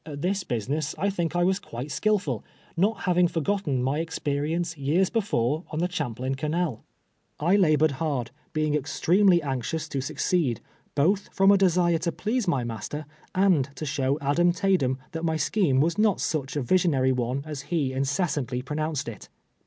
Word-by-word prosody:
At 145 -2 -7
this 190 +1 0
business 140 - -2
I 200 +1 +1
think 175 -3 -2
I 175 - +3
was 190 +2 +2
quite 130 -6 -7
skillful, 210 +6 0 0.3
not 195 +5 +1
having 180 -1 +3
forgotteii 165 -4 -1
my 135 +4 0
experience 160 +1 -2
years 160 +7 +1
before 160 - 0
on 155 - -5
the 175 +2 0
Champlain 130 -5 -2
canal. 150 -2 -2 0.6
I 170 +6 +3
labored 155 -5 +4
hard, 140 -7 -1 0.2
being 155 -1 0
extremely 170 +5 +3
anxious 140 +4 -2
to 140 -3 -2
succeed, 135 -1 0 0.4
both 190 +8 +2
from 195 0 +5
a - - +7
desire 175 -3 +3
to 170 +1 -1
please 225 +4 -2
my 140 -8 +1
master, 120 +6 -5 0.3
and 180 -8 +3
to 155 - -5
show 135 -1 0
Adam 170 +5 +3
Taydem 180 -9 +1
that 165 +1 -5
my 160 -1 +1
scheme 155 -7 +2
was 170 +6 +1
not 210 -3 +3
such 140 -4 -2
a 145 - 0
vis 185 +9 +3
ionary 130 -4 +2
one 125 +2 -1
as 150 -3 -5
he 150 -7 0
incessantly 135 -2 -1
pronounced 150 0 -2
it. 115 - -8
155 Hz, 170 wpm, -26 LUFS, 135-180 Hz, 0.6 s, a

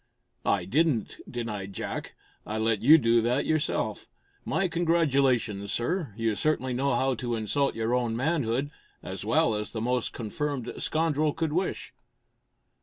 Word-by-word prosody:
"I 100 -3 +2
didn't," 140 - +1
denied 105 -5 -4
Jack. - - -5 0.3
"I 110 - -4
let 110 -1 +1
you 150 +8 +8
do 115 -4 +3
that 120 +4 +1
yourself. 155 0 -1 0.4
My 195 0 0
congratulations, 140 - +1
sir. 160 - -1
You 115 -1 +1
certainly 130 +1 0
know 135 +1 +1
how 130 +2 +2
to 120 0 -2
insult 135 +6 0
your 115 +1 -1
own 120 -2 +1
manhood 135 -1 0 0.3
as - - -5
well - - +3
as 105 0 -3
the 110 - -3
most 125 +1 0
confirmed 130 +2 -3
scoundrel 155 -2 +1
could 160 -2 -1
wish!" 185 +3 -2
125 Hz, 145 wpm, -28 LUFS, 115-150 Hz, 0.4 s, you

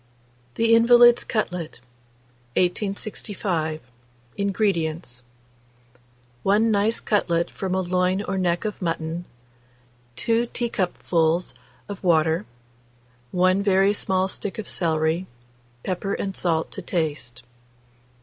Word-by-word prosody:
THE 230 0 +3
INVALID'S 240 +1 +7
CUTLET. 180 - -3 0.8
1865. 185 -3 -1 0.5
INGREDIENTS. 170 - -1 1.2
1 215 - +3
nice 210 +2 +2
cutlet 170 -5 0
from 190 -1 -3
a 190 - +1
loin 185 +2 0
or 195 - -3
neck 175 +2 0
of 210 -2 -4
mutton, 165 0 -3 0.9
2 230 - +1
teacupfuls 180 -7 0 0.3
of 200 -1 -8
water, 165 +1 +2 0.8
1 185 +4 +2
very 195 0 +3
small 190 -2 +1
stick 200 +2 -3
of 220 - -5
celery, 160 +1 0 0.6
pepper 190 +2 -2
and 195 -1 -4
salt 165 -2 +1
to - - -6
taste. 145 -8 -3
185 Hz, 100 wpm, -24 LUFS, 165-205 Hz, 1.2 s, INVALID'S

